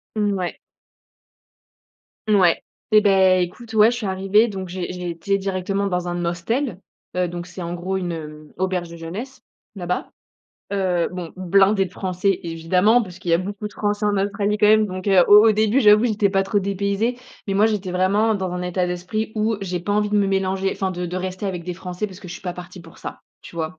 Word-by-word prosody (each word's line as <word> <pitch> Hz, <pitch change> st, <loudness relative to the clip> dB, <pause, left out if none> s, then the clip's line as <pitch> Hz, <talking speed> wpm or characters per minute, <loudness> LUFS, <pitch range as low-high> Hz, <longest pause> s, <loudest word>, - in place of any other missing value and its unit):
Mouais. 200 Hz, -4 st, -1 dB, 1.7 s
Ouais, 185 Hz, -5 st, +4 dB, 0.3 s
et 215 Hz, -, +8 dB
beh, 190 Hz, -2 st, +4 dB
écoute, 225 Hz, +6 st, -8 dB
ouais, 220 Hz, +2 st, +6 dB
je 240 Hz, -, -3 dB
suis 220 Hz, -, -4 dB
arrivée, 195 Hz, +4 st, +3 dB
donc 190 Hz, -3 st, -6 dB
j'ai 180 Hz, 0 st, -4 dB
j'ai 180 Hz, -1 st, -5 dB
été 195 Hz, +4 st, -1 dB
directement 195 Hz, +1 st, -2 dB
dans 180 Hz, -1 st, -2 dB
un 175 Hz, 0 st, -2 dB
hostel, 185 Hz, +6 st, -2 dB, 0.4 s
heu, 180 Hz, -, +2 dB
donc 175 Hz, +1 st, -6 dB
c'est, 180 Hz, +1 st, -9 dB
en 170 Hz, 0 st, -4 dB
gros, 185 Hz, +2 st, -2 dB
une, 175 Hz, -2 st, -3 dB
heu, 150 Hz, -1 st, -9 dB
auberge 185 Hz, -2 st, -1 dB
de 170 Hz, -, -9 dB
jeunesse, 190 Hz, +11 st, -7 dB, 0.3 s
là-bas, 180 Hz, -2 st, -3 dB, 0.6 s
heu, 185 Hz, -3 st, +1 dB
bon, 175 Hz, -3 st, -6 dB
blindée 195 Hz, +2 st, +3 dB
de 180 Hz, -, -9 dB
français, 190 Hz, 0 st, -1 dB
évidemment, 180 Hz, +7 st, +2 dB
parce 185 Hz, -5 st, -7 dB
qu'il 175 Hz, -, -3 dB
y -, -, +5 dB
a -, -, +3 dB
beaucoup 205 Hz, +3 st, -5 dB
de -, -, -19 dB
français 205 Hz, 0 st, -1 dB
en 205 Hz, -1 st, +1 dB
Australie 200 Hz, +1 st, 0 dB
quand 210 Hz, -, +4 dB
même, 215 Hz, 0 st, +5 dB
donc 185 Hz, +1 st, -6 dB
heu, 190 Hz, -3 st, +6 dB
au 210 Hz, +2 st, +8 dB
au 220 Hz, -, +6 dB
début, 215 Hz, +5 st, +2 dB
j'avoue 210 Hz, +1 st, +6 dB
j'étais 210 Hz, -3 st, +1 dB
pas 195 Hz, -1 st, +2 dB
trop 205 Hz, +1 st, 0 dB
dépaysée. 200 Hz, +4 st, -1 dB, 0.3 s
Mais 195 Hz, -, -1 dB
moi, 210 Hz, +3 st, +5 dB
j'étais 200 Hz, -4 st, -2 dB
vraiment 205 Hz, +4 st, +2 dB
dans 190 Hz, -2 st, -2 dB
un 180 Hz, 0 st, -4 dB
état 180 Hz, 0 st, -1 dB
d'esprit 180 Hz, +5 st, -3 dB
où 215 Hz, 0 st, +1 dB
j'ai 180 Hz, -2 st, -3 dB
pas 190 Hz, +4 st, -3 dB
envie 210 Hz, 0 st, +1 dB
de 210 Hz, -, +3 dB
me 200 Hz, -, +2 dB
mélanger, 195 Hz, 0 st, 0 dB
enfin 190 Hz, -1 st, -2 dB
de 180 Hz, -1 st, -4 dB
de 180 Hz, +2 st, -4 dB
rester 185 Hz, +2 st, -4 dB
avec 180 Hz, -3 st, -3 dB
des 180 Hz, 0 st, -5 dB
français, 185 Hz, +3 st, -5 dB
parce 185 Hz, 0 st, -12 dB
que 190 Hz, -, -11 dB
je 175 Hz, -, -7 dB
suis -, -, -9 dB
pas 180 Hz, -, -3 dB
partie 180 Hz, 0 st, -10 dB
pour 165 Hz, -, -16 dB
ça, -, -, -8 dB, 0.2 s
tu -, -, -13 dB
vois, 160 Hz, -1 st, -4 dB
190 Hz, 220 wpm, -22 LUFS, 180-205 Hz, 1.7 s, et